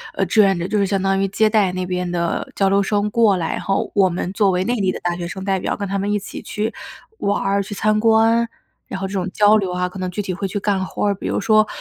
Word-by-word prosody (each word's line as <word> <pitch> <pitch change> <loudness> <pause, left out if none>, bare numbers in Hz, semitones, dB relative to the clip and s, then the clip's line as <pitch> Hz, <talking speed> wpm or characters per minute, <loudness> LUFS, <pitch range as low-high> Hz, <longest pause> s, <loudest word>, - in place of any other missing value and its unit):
呃 195 - +1
志 215 +4 +4
愿 195 -2 +3
者。 170 +1 -3
就 210 +2 0
是 200 - +2
相 195 0 0
当 195 0 +1
于 195 - +1
接 215 +3 +2
待 210 -4 +2
那 185 0 -2
边 180 -1 -2
的 170 -1 -2
交 195 -1 +2
流 200 +1 +3
生 205 +1 0
过 215 -4 +3
来， 165 -2 -2
然 - - -3
后 195 - -1
我 195 -2 +4
们 180 +1 -3
作 200 -1 +3
为 180 0 +1
内 235 - 0
地 190 - +2
的 - - -6
大 175 0 -1
学 175 0 -5
生 190 +2 -7
代 195 -1 +1
表 - - -2
跟 200 -1 -3
他 195 +1 -2
们 205 +1 -1
一 210 - +2
起， 205 - -7
去 215 +2 -3 0.5
玩 200 0 0
儿， 200 +1 +1
去 200 +1 -6
参 215 +1 +1
观。 225 +1 +3 0.4
然 190 - -5
后 195 - -3
这 190 - -8
种 190 -1 -2
交 210 0 +5
流 190 -3 -1
啊， 180 0 -1
可 185 +1 -9
能 185 - -2
具 180 - -7
体 190 - -3
会 195 +2 -3
去 200 +2 -3
干 195 -2 0
活 190 - -3
儿， 205 - +2
比 195 - -6
如 - - -1
说 215 0 +3
195 Hz, 320 characters per minute, -20 LUFS, 185-210 Hz, 0.5 s, 交